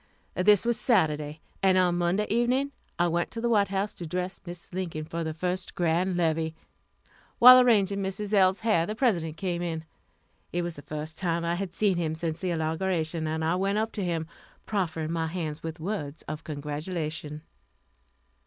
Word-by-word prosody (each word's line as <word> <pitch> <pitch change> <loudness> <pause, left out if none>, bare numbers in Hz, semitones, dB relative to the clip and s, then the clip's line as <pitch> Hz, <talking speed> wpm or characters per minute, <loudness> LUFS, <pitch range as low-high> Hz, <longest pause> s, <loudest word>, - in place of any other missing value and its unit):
This 205 +3 +4
was 235 -1 +1
Saturday, 155 - +1 0.2
and 190 -1 +4
on 180 -1 +3
Monday 175 +4 +1
evening 250 +5 +1 0.3
I 175 - +3
went 170 0 0
to 230 - -6
the 235 +1 0
White 205 -3 +4
House 195 +2 -2
to 170 - -7
dress 180 +3 -3
Mrs. 175 0 -10
Lincoln 170 -4 -3
for 165 +1 -4
the 160 - -2
first 180 +3 -3
grand 175 +1 +1
levee. 160 -1 0 0.8
While 255 +1 +10
arranging 200 -5 +3
Mrs. 195 +2 -3
L.'s 190 -1 +4
hair, 215 -7 +2
the 215 - -3
President 170 - +1
came 175 -1 -2
in. 165 -2 -3 0.7
It 175 0 -1
was 170 -1 -4
the - - -8
first 155 +2 -7
time 170 -2 0
I 170 - +1
had 180 -1 -4
seen 200 -4 +2
him 160 -2 -1
since 160 0 -3
the 185 - -2
inauguration, 160 0 -1
and 160 +1 -1
I 165 - +2
went 195 +3 0
up 220 +1 0
to 205 - -3
him, 165 -3 -1 0.4
proffering 165 -6 -1
my 165 -1 -1
hand 160 -3 -4
with 160 0 -6
words 160 -4 -4
of 155 +1 -6
congratulation. 150 +1 -4
175 Hz, 180 wpm, -27 LUFS, 160-195 Hz, 0.8 s, While